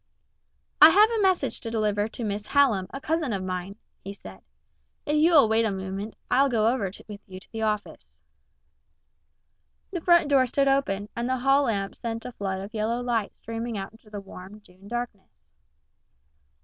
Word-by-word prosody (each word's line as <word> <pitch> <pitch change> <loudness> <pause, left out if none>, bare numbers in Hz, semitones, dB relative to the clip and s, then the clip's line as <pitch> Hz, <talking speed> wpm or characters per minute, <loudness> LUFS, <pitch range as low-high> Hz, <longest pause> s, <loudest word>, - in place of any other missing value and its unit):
"I 310 - +12
have 420 +6 +5
a 450 -2 0
message 375 -2 +1
to 230 - -6
deliver 210 -2 0
to 230 +2 -7
Miss 210 0 -3
Hallam, 235 -10 +3
a 275 - -7
cousin 310 -4 -1
of 190 -2 -3
mine," 185 +1 -4 0.3
he 195 - -6
said. - - -13 0.6
"If 295 - 0
you 320 +3 +4
will 285 -7 +7
wait 220 +1 +2
a 220 - +1
moment, 195 +2 -5 0.2
I'll 275 +2 +4
go 225 -4 +1
with 220 - +4 0.6
you 185 - -11
over - - -7
to - - -20
the 225 - -5
office." 215 -1 -4 1.7
The 355 -3 -4
front 345 -2 +4
door 270 -3 +4
stood 275 +3 +1
open, 210 -8 0
and 235 +1 -2
the 260 - +1
hall 275 +3 +3
lamp 200 -5 -2
sent 230 -1 -5
a 250 - -5
flood 190 -4 -4
of 200 +3 -9
yellow 225 +2 -1
light 235 -4 -2
streaming 230 0 -5
out 195 0 -5
into 225 -1 -20
the 210 -1 -6
warm, 195 +1 -11
June 190 0 -18
darkness. 240 -4 -6
225 Hz, 185 wpm, -26 LUFS, 200-270 Hz, 1.7 s, I